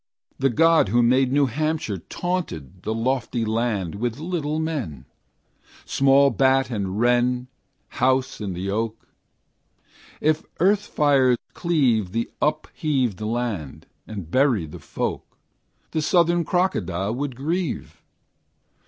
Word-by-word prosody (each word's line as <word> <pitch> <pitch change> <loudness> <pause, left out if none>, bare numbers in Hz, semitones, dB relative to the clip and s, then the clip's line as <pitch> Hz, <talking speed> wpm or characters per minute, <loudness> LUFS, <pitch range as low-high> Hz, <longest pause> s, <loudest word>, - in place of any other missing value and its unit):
The 135 0 +3
God 165 - +4
who 120 +3 +3
made 130 +2 +3
New 140 +1 +4
Hampshire 150 - -2
Taunted 95 - -4
the 110 - -2
lofty 120 -1 -1
land 110 -6 -1
With 115 +3 -2
little 155 -2 -2
men; 135 - -3 0.8
Small 135 0 +4
bat 130 +1 +2
and 100 -2 -2
wren 125 +1 +2 0.4
House 130 0 0
in 100 -3 -3
the 95 +3 -3
oak: 110 +1 -3 1.1
If 155 +1 +1 0.2
earth 200 +3 +3
fire 135 -4 +3 0.2
cleave 125 - +1
The 115 +1 -2
upheaved 135 - 0
land, 110 - -3 0.2
and 100 -7 -7
bury 130 - +3
the 75 - -10
folk, - - -4 0.5
The 155 - 0
southern 170 +1 +3
crocodile 105 - 0
would 135 +1 -3
grieve. 160 +5 -3
125 Hz, 120 wpm, -23 LUFS, 110-150 Hz, 1.1 s, God